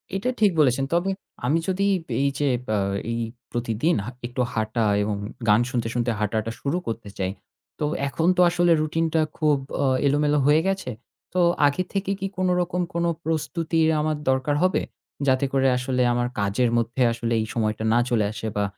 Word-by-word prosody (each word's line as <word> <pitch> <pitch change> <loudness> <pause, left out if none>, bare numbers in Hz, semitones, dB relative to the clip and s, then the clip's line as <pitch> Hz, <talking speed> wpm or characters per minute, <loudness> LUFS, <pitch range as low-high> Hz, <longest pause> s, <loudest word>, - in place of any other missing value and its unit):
এটা 195 +6 -1
ঠিক 205 -2 +5
বলেছেন। 135 -2 +3
তবে 175 +3 +2 0.4
আমি 145 +6 +3
যদি 190 +1 +1 0.4
এই 140 - +3
যে 145 - +1
আব 125 - -19 0.4
এই 115 - -2 0.3
প্রতিদিন 120 +7 0
হা - - -4 0.2
একটু 125 +1 -3
হাঁটা 110 +1 0 0.2
এবং 105 0 -1 0.3
গান 105 +3 +6
শুনতে, 120 -3 -1
শুনতে 120 0 0
হাঁটাটা 110 +1 -1
শুরু 145 +5 0
করতে 115 -2 -4
চাই। 95 -1 -1 0.5
তো 150 - 0 0.2
এখন 160 +4 -1
তো - - +5
আসলে 175 0 +2
routine 165 +2 0
টা 160 - +3 0.2
খুব 150 -2 +3 0.2
অ্যা 140 - +1 0.2
এলোমেলো 145 +1 +2
হয়ে 150 +2 +5
গেছে। 190 -9 -1 0.4
তো 185 - +1 0.3
আগে 145 +6 0
থেকে 195 -1 -1
কি 195 - -2
কোনো 185 -1 +1
রকম 180 0 -1
কোনো 170 0 +1 0.2
প্রস্তুতির 160 0 0
আমার 155 0 0
দরকার 130 +2 +1
হবে? 185 0 +2 0.5
যাতে 130 +1 +3
করে 135 -1 +3
আসলে 125 0 -1
আমার 120 0 0
কাজের 100 +5 +1
মধ্যে 120 +2 -1
আসলে 115 0 -2
এই - - -2
সময়টা 110 -1 -1
না 120 - +4
চলে 110 -4 +2
আসে 110 0 -5
বা 105 - +1
135 Hz, 180 wpm, -24 LUFS, 115-165 Hz, 0.5 s, গান